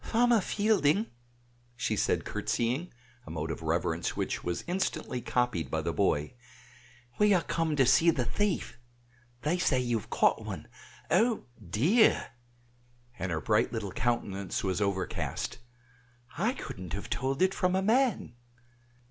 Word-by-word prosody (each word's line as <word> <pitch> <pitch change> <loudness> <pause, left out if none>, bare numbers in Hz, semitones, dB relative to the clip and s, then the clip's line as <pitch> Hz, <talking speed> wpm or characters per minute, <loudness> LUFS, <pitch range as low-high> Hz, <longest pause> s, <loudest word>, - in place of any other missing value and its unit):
"Farmer 235 -1 +3
Fielding," 205 -1 +2 0.7
said 110 -4 +1
she - - -18
curtsying, 125 +9 -1 0.4
a - - -7
mode 80 0 -3
of 80 - -5
reverence 80 +1 -1
which - - -2
was 90 -1 -2
instantly 175 -8 -2
copied 120 -9 0
by - - -1
the - - -1
boy, 75 +7 +1 0.9
"we 210 -1 +5
are 175 - +2
come 165 -2 0
to 135 -2 +4
see 135 +7 +5
the 130 -7 +1
thief; 185 - -1 0.6
they 170 +4 +1
say 140 -7 +2
you 120 -2 0
have - - -14
caught - - +2
one. - - -6 0.4
Oh, 230 -1 +3 0.2
dear!" 180 - +3 0.9
(and 90 -1 -2
her 80 -1 -1
bright 110 0 +2
little 110 -4 -3
countenance 100 -5 -1
was 95 +1 -1
overcast), 100 +1 -2 0.8
"I 215 - +1
couldn't 90 - -7
have 100 - -4
told 135 +5 0
it 190 +1 +3
from 185 -1 +1
a 190 - +1
man!" 230 - +2
130 Hz, 145 wpm, -30 LUFS, -, 0.9 s, we